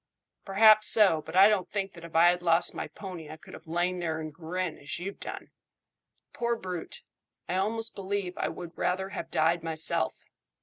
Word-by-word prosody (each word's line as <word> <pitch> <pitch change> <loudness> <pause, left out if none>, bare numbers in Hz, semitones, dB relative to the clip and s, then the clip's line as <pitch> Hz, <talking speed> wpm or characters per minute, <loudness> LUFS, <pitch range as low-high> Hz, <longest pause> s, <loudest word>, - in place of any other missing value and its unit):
"Perhaps 215 +2 +6
so, 195 -8 +5
but 160 - -9
I 195 +2 +8
don't 210 -4 +1
think 195 -2 -3
that 170 - -13
if 170 -1 -11
I 170 +2 +7
had 175 0 -3
lost 170 -1 +3
my - - -5
pony 180 -6 -9
I 155 - -8
could - - -15
have - - -12
lain 175 +2 -1
there 160 -2 -2
and 155 -1 -6
grinned 175 +1 -4
as 140 - -6
you've 195 +3 -6
done. - - -7 0.8
Poor 235 0 -1
brute! 185 -5 -6 0.4
I 185 - -1
almost 225 +4 0
believe 195 -2 -3
I - - -1
would 175 -1 -8
rather 190 +1 -1
have - - -6
died 165 +2 +2
myself." 160 -1 0
180 Hz, 190 wpm, -28 LUFS, 165-195 Hz, 0.8 s, I